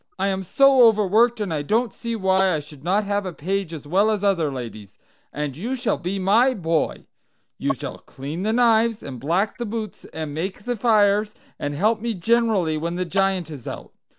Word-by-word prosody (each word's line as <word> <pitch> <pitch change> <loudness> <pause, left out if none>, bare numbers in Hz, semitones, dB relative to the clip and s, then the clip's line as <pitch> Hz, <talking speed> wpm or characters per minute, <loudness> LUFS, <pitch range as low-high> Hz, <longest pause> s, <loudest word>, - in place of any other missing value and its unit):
I 200 - 0
am 190 0 -1
so 270 +7 +4
overworked, 220 +2 +3
and 200 -6 -2
I 150 - -1
don't 220 +8 0
see 230 -1 -4
why 190 -3 +2
I - - -1
should 145 -1 -13
not 195 +5 +1
have 205 0 -1
a 185 - -4
page 185 +2 -3
as 155 -3 -8
well 195 +8 +2
as 210 -2 -1
other 170 -7 +2
ladies. 115 -6 -8 0.3
And 145 -3 -4
you 230 - -3
shall 250 - -1
be 185 +3 -3
my 225 +7 +3
boy. 165 -4 -1 0.5
You - - 0
shall - - -7
clean 145 +6 -7
the 215 +3 0
knives, 230 -1 +3
and 130 -3 -7
black 180 - 0
the 240 - -2
boots, 215 -1 -5
and 155 -2 -6
make 185 +6 -4
the 245 +1 -2
fires, 210 -2 +2 0.2
and 145 0 -3
help 215 +7 +1
me 230 -1 -2
generally 200 -5 +1
when 170 +2 -3
the 180 +1 -1
Giant 190 -2 0
is 135 -6 -9
out. - - -7
195 Hz, 205 wpm, -23 LUFS, 160-220 Hz, 0.5 s, so